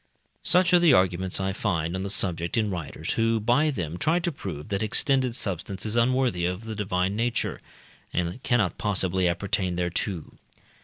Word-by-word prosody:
Such 180 0 +3
are 175 - +7
the 170 -5 +5
arguments 95 -2 +2
I 95 0 -1
find 85 -5 -1
on 95 - -3
the 100 - -3
subject 85 -1 0
in 105 -2 +1
writers, 85 -5 -4
who 115 0 +1
by 120 +8 +2
them 90 - -4
try 160 +3 +2
to 175 - -1
prove 95 - -7
that 100 -1 -1
extended 130 +2 +2
substance 95 0 -2
is 110 +1 -1
unworthy 120 -5 +2
of 90 +5 -4
the 110 - -5
divine 95 -2 -1
nature, 120 +1 -1 0.5
and 90 +7 -2
cannot 115 -11 +1
possibly 95 -3 +1
appertain 90 +1 -1
thereto. 90 0 -3
100 Hz, 170 wpm, -26 LUFS, 90-120 Hz, 0.5 s, are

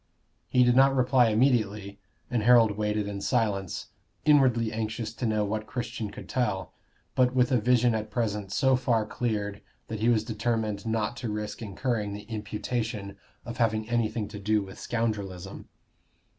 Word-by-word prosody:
He 125 - +4
did 120 0 +4
not 135 +1 +5
reply 125 -1 +4
immediately, 105 -4 +1 0.3
and 120 -3 +1
Harold 115 -1 +6
waited 105 0 -1
in 100 -1 -5
silence, 100 -2 -1 0.4
inwardly 125 -7 +4
anxious 110 0 -3
to 120 +1 -2
know 105 -1 +1
what 110 +1 -3
Christian 115 -1 -4
could - - -10
tell, 95 -8 -1 0.4
but 125 0 +2
with 125 +1 +3
a 125 -3 +3
vision 120 0 +3
at 110 -1 -2
present 105 -3 -2
so 130 +5 +3
far 120 -4 +1
cleared 105 -4 -2 0.3
that 110 -2 -4
he 115 +2 +2
was 110 -3 +3
determined 110 -1 -2
not 110 0 -1
to 120 -3 -4
risk 105 0 -4
incurring 105 -1 -2
the 105 0 -7
imputation 105 -1 -4 0.3
of 120 0 -6
having 110 -2 +1
anything 115 -2 0
to 105 - -8
do 105 +1 +1
with 95 0 -11
scoundrelism. 100 -5 -3
110 Hz, 160 wpm, -28 LUFS, 105-120 Hz, 0.4 s, Harold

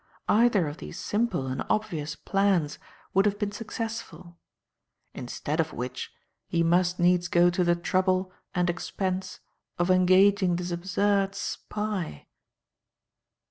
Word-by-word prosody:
Either 210 -6 +4
of 145 +2 -6
these 175 - -8
simple 210 - -1
and 130 0 -3
obvious 160 -9 -1
plans 195 -7 +1 0.3
would 195 - +4
have 205 0 0
been 205 -1 -2
successful; 215 -6 -6 0.8
instead 145 +5 -4
of 160 -1 0
which, 125 +2 -5 0.4
he 170 0 +1
must 175 +1 +2
needs 175 0 +3
go 175 0 +4
to 180 +1 +1
the 175 0 +3
trouble 185 +2 +1 0.2
and 180 0 +2
expense 185 +1 -3 0.4
of 175 +1 +2
engaging 185 0 +4
this 175 0 -3
absurd 195 +3 +1
spy." 210 - -4
180 Hz, 125 wpm, -27 LUFS, 170-200 Hz, 0.8 s, Either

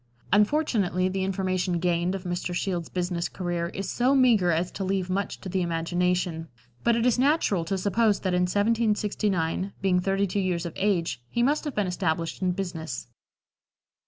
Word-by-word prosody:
Unfortunately, 205 - +2
the 190 0 -2
information 185 -2 0
gained 175 +1 0
of 190 - -6
Mr. 175 0 -3
Shields' 175 -3 -2
business 175 -1 -2
career 175 -2 -2
is 195 +3 -5
so 255 +3 +2
meagre 235 -9 +4
as 170 +2 +1
to 195 - -4
leave 190 -1 -1
much 200 +2 -2
to - - -7
the 185 0 -1
imagination, 175 0 -1 0.4
but 235 0 +3
it 235 0 +1
is 250 -1 +3
natural 265 - +2
to 195 +4 -1
suppose 205 +2 +2
that 185 -2 -1
in 180 - +2
1769, 205 -4 0
being 185 -2 +2
thirty 195 +2 +1
two 200 +1 -2
years 180 -3 -1
of 170 - -5
age, 185 - 0
he 235 - 0
must 290 +5 +1
have 295 - -4
been 210 - +1
established 170 -2 -2
in 185 -1 +2
business. 165 - -5
185 Hz, 175 wpm, -26 LUFS, 175-205 Hz, 0.4 s, meagre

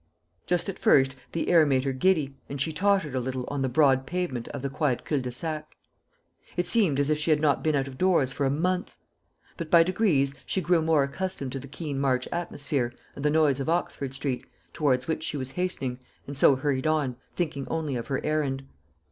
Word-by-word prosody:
Just 175 +1 +1
at 195 - -5
first 135 0 +4 0.2
the 165 - -2
air 170 -2 +7
made 135 -3 +2
her 135 - 0
giddy, 145 -2 +1
and 140 - -5
she 160 +4 -1
tottered 190 -3 +1
a 130 - 0
little 130 0 -3
on 145 -1 -2
the 130 - +1
broad 135 -1 +3
pavement 170 -10 -2
of 140 - -6
the 140 - -1
quiet 140 -4 0
cul 150 - 0
de 125 -1 -4
sac. 155 +3 -4 0.8
It 175 - +1
seemed 185 -12 +2
as 145 +1 +2
if 150 - +1
she 155 - 0
had 155 -1 +4
not 150 -2 +2
been 155 -1 +2
out 135 -1 0
of 130 -1 -10
doors 175 -8 +3
for 140 -1 0
a - - +2
month. 180 +6 -1 0.6
But 170 -3 -5
by 170 0 +7
degrees 165 -7 +2
she - - -1
grew 175 -2 +2
more 160 -3 +3
accustomed 140 -1 -3
to 135 - -4
the 140 - -10
keen 145 0 -5
March 130 -2 +1
atmosphere 140 -7 -2 0.2
and 140 - -7
the 150 - +3
noise 150 -3 +3
of 135 - -2
Oxford 140 -5 -1
street, 135 -2 -3 0.3
towards 130 -5 +1
which 160 -1 -1
she 150 - -3
was 130 -1 -4
hastening, 135 -8 -2 0.3
and 140 - -7
so 135 0 +6
hurried 135 0 -1
on, 150 -5 +1 0.2
thinking 150 -6 -2
only 155 -4 -2
of 120 - -4
her 135 - -2
errand. 145 -3 0
145 Hz, 215 wpm, -27 LUFS, 135-165 Hz, 0.8 s, air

